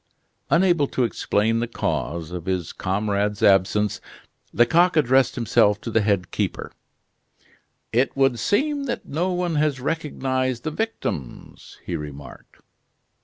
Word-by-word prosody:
Unable 170 -4 +3
to 130 - -1
explain 115 -1 0
the 120 - -1
cause 85 -7 -3
of 90 -1 -6
his 90 -3 -2
comrade's 100 +1 -1
absence, 100 +1 +3 0.5
Lecoq 165 - +3
addressed 130 -3 +3
himself 105 -3 +2
to 115 - -5
the 115 - +3
head 100 -4 0
keeper: - - -3 1.2
"It 130 +4 +1
would 135 -3 +2
seem 285 +6 0
that 240 - -4
no 175 +6 -1
one 175 -3 -1
has 150 -3 +1
recognized 130 -4 -2
the 155 - -2
victims," 155 - -5
he - - -3
remarked. 70 -3 -10
120 Hz, 125 wpm, -23 LUFS, 100-155 Hz, 1.2 s, Unable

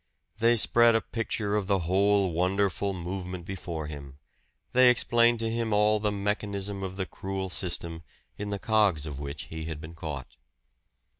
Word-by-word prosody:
They 115 +1 +5
spread 120 +1 +5
a 115 - +3
picture 110 -3 -2
of 105 -3 -1
the 100 -1 +3
whole 95 +2 +2
wonderful 95 +3 +1
movement 90 -1 -5
before 85 -4 -5
him; 70 -2 -9 0.5
they 125 0 +6
explained 120 -1 +3
to 115 0 -1
him 115 -1 -1
all 105 +1 +3
the 105 0 0
mechanism 100 -1 -2
of 95 -1 -5
the 95 -1 -2
cruel 95 0 -5
system, 85 -2 -1 0.3
in 105 0 -5
the 100 - -2
cogs 100 -7 +2
of 70 -3 -6
which 70 -1 -6
he 80 0 -7
had 80 -2 -5
been 80 +2 -9
caught. 75 -6 -7
95 Hz, 165 wpm, -28 LUFS, 85-105 Hz, 0.5 s, they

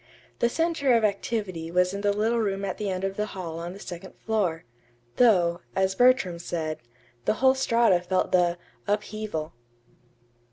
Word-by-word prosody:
The 235 - +3
center 320 -4 +2
of 230 - +2
activity 200 -5 -1
was 180 +2 +2
in 200 - -4
the 205 0 +2
little 220 +3 +1
room 200 -2 -1
at 190 - -4
the 210 -2 -2
end 185 0 -3
of 195 0 -2
the 210 0 -1
hall 165 -3 -5
on 170 +1 -5
the 195 - -11
second 180 -1 -9
floor; 190 -7 -1 0.5
though, 180 -8 +4
as 190 0 +2
Bertram 245 -7 +3
said, 160 -2 -3 0.5
the - - +2
whole 260 +3 +4
Strata 235 -8 +3
felt 185 +1 0
the 175 -1 +3 0.3
"upheaval." 210 -6 -3
195 Hz, 165 wpm, -26 LUFS, 175-220 Hz, 0.5 s, though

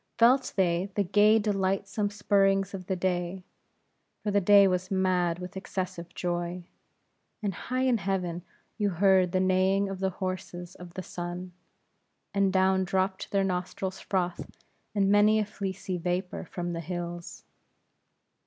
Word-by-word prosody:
Felt 255 +3 +4
they 180 0 +1
the 205 - +2
gay 210 +3 +5
delightsome 200 0 0
spurrings 195 -1 +2
of 185 -2 -7
the 190 - 0
day; 180 0 -2 0.8
for 210 - 0
the 200 0 +3
day 200 +1 +7
was 185 0 -1
mad 185 -3 +1
with 180 +1 -8
excessive 185 -2 -5
joy; 175 0 -2 0.8
and 200 -2 0
high 255 +8 -2
in 250 -3 +3
heaven 180 -3 -2 0.4
you 205 -1 +2
heard 185 0 +3
the 185 - +1
neighing 190 +1 +2
of 195 -1 -5
the 190 0 +1
horses 185 -1 -5
of 175 -1 -12
the 185 - -4
sun; 175 +1 -6 0.8
and 200 -1 +2
down 190 0 +3
dropt 190 +1 -1
their 195 -1 +2
nostrils' 185 +1 -3
froth 180 -3 -2 0.5
in 200 -1 +3
many 210 +1 +5
a 215 - +1
fleecy 190 -3 -4
vapor 180 +2 -2
from 175 +1 -4
the 165 - -3
hills. 175 0 -6
190 Hz, 145 wpm, -28 LUFS, 180-200 Hz, 0.8 s, day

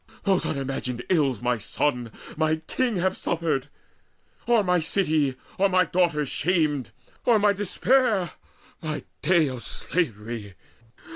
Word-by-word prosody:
Those 195 -2 +2
unimagined 130 -3 -3
ills 140 - +2
my 125 -1 +1
sons, 120 +2 -1 0.3
my 155 0 +2
king 220 +8 -1
Have 190 +1 +1
suffered? 160 -5 -1 0.8
or 235 -3 +4
my 180 -1 +2
city, 155 -5 +1 0.2
or 200 +1 +4 0.2
daughters 165 -5 +1
shamed? 150 - +1 0.3
Or 235 -2 +5
my 205 -1 +4
despair, 205 0 +2 0.5
my 155 -2 -3 0.2
day 165 -1 +4
of 130 -3 -5
slavery? 115 - -3
155 Hz, 120 wpm, -25 LUFS, 135-185 Hz, 0.8 s, Or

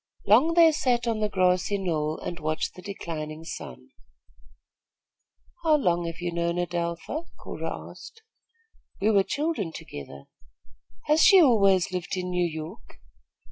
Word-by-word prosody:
Long 255 +12 +5
they 335 -2 +7
sat 245 -5 0
on 225 -2 0
the 210 0 0
grassy 185 +1 +1
knoll 160 -5 -1
and 175 - -5
watched 155 0 -2
the 180 - -12
declining 160 -5 -6
sun. 65 - -9 1.7
"How 315 -2 +4
long 175 - 0
have 165 0 -6
you 175 0 -3
known 170 0 -1
Adelpha?" 175 - -3
Cora - - -6
asked. 450 0 -13 0.8
"We 210 +3 +2
were 200 -2 +5
children 285 - -2
together." 70 - -9 0.8
"Has 305 +2 +3
she 390 - +8
always 200 - +4
lived 185 +1 -3
in 180 0 -3
New 180 -1 +1
York?" 155 0 -9
180 Hz, 140 wpm, -26 LUFS, 170-230 Hz, 1.7 s, she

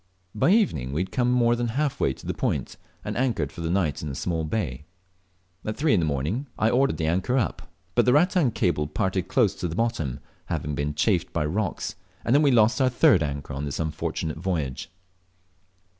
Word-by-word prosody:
By 105 - +2
evening 80 - +2
we 80 - 0
had 95 - -4
come 125 -1 +1
more 120 -1 +3
than 120 0 -1
half 140 +3 -1
way - - +2
to - - -11
the - - -2
point, - - -2 0.3
and - - -3
anchored 115 - 0
for - - -9
the 80 - -2
night 85 -5 0
in 75 - -4
a 70 - -5
small 80 +3 -2
bay. 75 - -3 0.8
At 110 - -4
three 155 -4 +2
the 100 - +4
next 80 - 0
morning 75 - -2
I 110 +1 +2
ordered 135 +2 +2
the 80 - -1
anchor 95 +11 +1
up, 110 - -2 0.2
but - - +3
the 125 - +4
rattan 175 -1 +4
cable 75 -8 0
parted 95 +3 -1
close 110 -7 +3
to 95 -2 -4
the 80 - -5
bottom, 100 - -1 0.3
having 75 - -2
been 75 +1 -2
chafed 90 +2 +1
by 80 -2 -1
rocks, 95 +3 -2 0.3
and 120 - +3
we 145 - +5
then 130 - +4
lost 115 +5 +4
our 130 - +4
third 125 - +4
anchor 70 -1 -3
on 70 +2 -3
this 70 - -4
unfortunate 80 0 -3
voyage. 80 -8 -3
95 Hz, 210 wpm, -25 LUFS, 75-120 Hz, 0.8 s, we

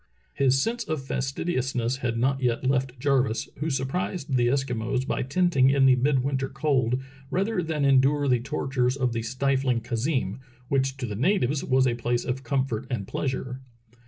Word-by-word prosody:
His 135 -1 +3
sense 230 - -1
of 155 -4 -3
fastidiousness 130 -3 -1
had 120 -4 -2
not 135 +3 +1
yet 125 0 0
left 130 -1 0
Jarvis, 130 -4 +1
who 155 +2 -1
surprised 135 +2 -2
the 120 -1 +3
Eskimos 125 -1 -1
by - - -1
tenting 135 -1 +3
in 135 -1 +4
the 130 -1 +6
midwinter 135 0 +1
cold 130 -3 +1 0.3
rather 195 +4 0
than 155 -3 -1
endure 140 +2 +4
the 125 -2 +3
tortures 125 +1 -1
of 125 -3 0
the 115 - -1
stifling 130 +1 0
khazeem^ 120 -2 -1 0.3
which 135 -1 +1
to 130 - -3
the 105 -3 -4
natives 140 - +1
was 130 0 +3
a 125 - +2
place 120 0 -1
of 130 +1 -2
comfort 130 -3 -1
and 110 -7 -3
pleasure. 130 -1 -3
130 Hz, 165 wpm, -26 LUFS, 125-140 Hz, 0.3 s, the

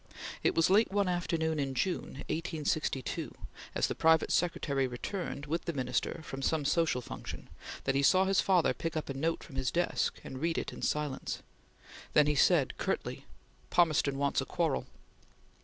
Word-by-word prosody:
It - - +2
was 165 +2 +4
late 210 +2 +5
one 200 -1 +2
after 175 -2 0
noon 160 -1 0
in 135 -2 -1
June, 140 -1 -2
1862, 155 -4 -2 0.4
as - - +2
the - - -1
private 160 0 +4
secretary 140 -6 +1
returned, 145 +4 -4
with 165 +3 -2
the 170 - -2
Minister, 130 +3 -1
from 135 -2 -6
some 150 +1 +1
social 155 -3 +2
function, - - -8 0.3
that 135 - +1
he 135 - +2
saw 185 +7 +5
his 195 0 +3
father 185 -4 +3
pick 165 -1 -3
up 155 - -4
a - - -1
note 160 +5 -1
from 135 - -10
his 130 -1 +1
desk 175 +1 0
and 130 0 -7
read 165 0 0
it - - -3
in - - -9
silence. 150 -3 -2 0.7
Then 150 - +6
he 150 - +2
said 145 -1 +3
curtly: - - -2 0.4
"Palmerston 155 -5 +3
wants 140 -1 +1
a - - -4
quarrel!" 165 -4 -1
155 Hz, 175 wpm, -31 LUFS, 135-170 Hz, 0.7 s, Then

